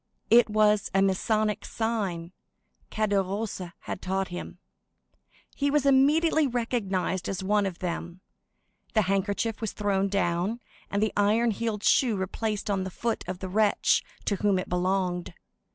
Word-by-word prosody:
It 235 0 +6
was 210 0 +3
a 195 - +4
Masonic 210 +2 +1
sign 200 -7 -2 0.6
Caderousse 200 -2 -1
had - - -6
taught 190 +1 -1
him. 175 0 -7 1.0
He 285 0 +1
was 290 -1 +2
immediately 295 +3 +4
recognized 200 -7 -1
as 190 -1 -3
one 205 +1 +2
of 180 -3 -5
them; 175 0 -5 0.7
the 215 - +4
handkerchief 200 +4 -1
was 220 - -3
thrown 200 -2 0
down, 195 +3 0 0.3
and 200 +1 0
the 215 - 0
iron 215 +3 +3
heeled 215 -1 -3
shoe 240 -5 +4
replaced 205 +2 -3
on 195 -2 0
the 190 - -4
foot 230 +5 -2
of 185 0 -4
the 190 - -3
wretch 210 +2 +2 0.2
to 200 - 0
whom 200 -1 +2
it 185 - -3
belonged. 180 -1 -1
205 Hz, 145 wpm, -27 LUFS, 190-225 Hz, 1.0 s, It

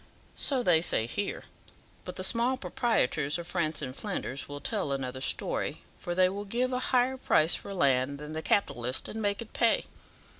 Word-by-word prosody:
"So 265 -3 +1
they 170 -5 +5
say 110 -9 +2
here; 200 - -3 0.6
but 180 - -6
the 185 - -5
small 240 +6 +2
proprietors 175 - +1
of 170 - -6
France 160 -4 -1
and 130 -1 -5
Flanders 140 - -4
will 145 0 -6
tell 140 - -2
another 130 -1 -3
story, - - -1 0.2
for 175 - -4
they 185 0 +5
will 200 +2 -4
give 245 +5 -1
a 250 - +1
higher 255 +1 +3
price 160 -9 +3
for - - -4
land 140 -5 +2
than 150 +1 -8
the 160 - -3
capitalist, 125 -10 0
and 220 - -5
make 205 +2 0
it 220 - -19
pay. 230 -1 +2
180 Hz, 185 wpm, -29 LUFS, 140-225 Hz, 0.6 s, they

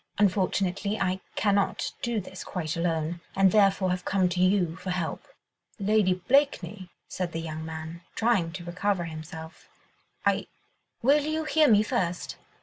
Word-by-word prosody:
Unfortunately, 195 +1 +1
I 190 -1 0 0.2
cannot 200 -2 +1
do 235 -2 0
this 190 -1 -8
quite 165 -5 -3
alone, 165 0 -1
and 195 -1 +5
therefore 195 -2 +4
have 180 0 -2
come 190 -2 +2
to 180 0 -1
you 185 -3 +3
for 185 - -6
help." 180 -3 -3 0.5
"Lady 205 -2 +3
Blakeney," 210 - +2 0.2
said 180 -2 -4
the 165 - -2
young 160 -1 -5
man, 160 +1 -7
trying 220 -8 +2
to 175 -1 -7
recover 180 +1 0
himself, 160 0 -9 0.6
"I.. - - +2 0.3
." - - -49
"Will 285 +4 +5
you 310 +1 -1
hear 310 0 +4
me 210 -4 +6
first?" 185 -7 -2
185 Hz, 150 wpm, -27 LUFS, 170-205 Hz, 0.6 s, me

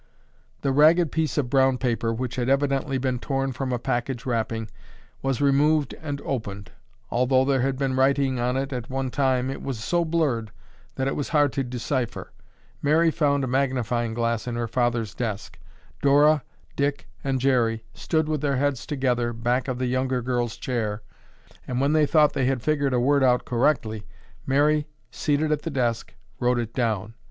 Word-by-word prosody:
The 140 - +2
ragged 155 +3 +5
piece 160 -1 -1
of 140 -4 +1
brown 135 -1 +4
paper, 120 -3 0
which 125 +2 -3
had 125 0 -1
evidently 135 0 +1
been 130 -1 -1
torn 135 +1 -1
from 130 +1 -3
a 125 - 0
package 120 +1 -2
wrapping, 115 -2 -2 0.5
was 135 0 -1
removed 145 +1 +3
and 145 -3 -4
opened. 100 -7 -4 0.4
Although 130 +2 +3
there 135 -2 +2
had 135 0 0
been 135 -1 -1
writing 135 -1 +2
on 125 +2 0
it 135 +1 -2
at 120 -2 -5
one 135 -1 -2
time, 130 -1 +1
it - - -6
was 135 -4 -4
so 175 +8 +1
blurred 150 -9 0 0.5
that 130 - -1
it 135 - -1
was 145 - -3
hard 145 -4 +3
to 135 - 0
decipher. 125 0 -3 0.5
Mary 160 +3 +3
found 140 -3 +1
a - - -1
magnifying 125 -3 0
glass 115 0 -1
in 120 - -2
her 120 0 -2
father's 120 -2 0
desk. 110 -4 -5 0.4
Dora, 145 +2 +5 0.3
Dick 140 -8 -1 0.2
and 135 -1 0
Jerry 120 -4 +1
stood 160 -1 -1
with 155 -2 -1
their 140 -2 +1
heads 140 -3 -1
together 125 -4 0
back 120 +3 -1
of 130 -2 -2
the 130 - -1
younger 130 0 0
girl's 120 -2 -1
chair, 110 -4 -3 0.6
and 125 0 -2
when 140 +3 +2
they 155 -1 +4
thought 150 -1 +4
they 130 - 0
had 130 -3 0
figured 145 -4 +1
a - - +2
word 140 +2 +3
out 125 -1 +3
correctly, 115 -4 0 0.4
Mary, 150 +2 +2 0.2
seated 150 +1 0
at 150 -1 +1
the 165 - -4
desk, 120 -5 -2 0.2
wrote 125 0 +2
it 115 -1 -3
down. 110 -4 -1
130 Hz, 180 wpm, -25 LUFS, 120-140 Hz, 0.6 s, ragged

